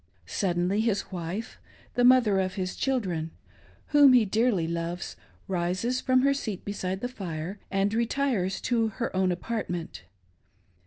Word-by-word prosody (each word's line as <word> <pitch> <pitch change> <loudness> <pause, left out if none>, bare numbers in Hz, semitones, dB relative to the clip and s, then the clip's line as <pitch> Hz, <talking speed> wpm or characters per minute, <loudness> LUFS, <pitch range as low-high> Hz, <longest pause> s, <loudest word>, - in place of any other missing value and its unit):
Suddenly 180 - 0
his 220 -3 -1
wife 180 +5 -5 0.2
— - - -27
the 245 - +1
mother 245 -6 +5
of 185 -1 -1
his 185 -2 -3
children 185 -12 -1 0.3
— - - -29
whom 290 -3 +7
he 240 -3 +6
dearly 210 -4 +1
loves, 170 +2 -4 0.3
rises 185 +7 -1
from 255 -1 +3
her 275 0 +4
seat 215 -9 -4
beside 190 -1 -3
the 245 - -1
fire 185 -5 -6
and 195 +1 +1
retires 230 -5 0
to 230 -3 +1
her 220 0 -4
own 185 -1 +2
apartment. 175 -3 -4
200 Hz, 150 wpm, -27 LUFS, 180-240 Hz, 0.3 s, whom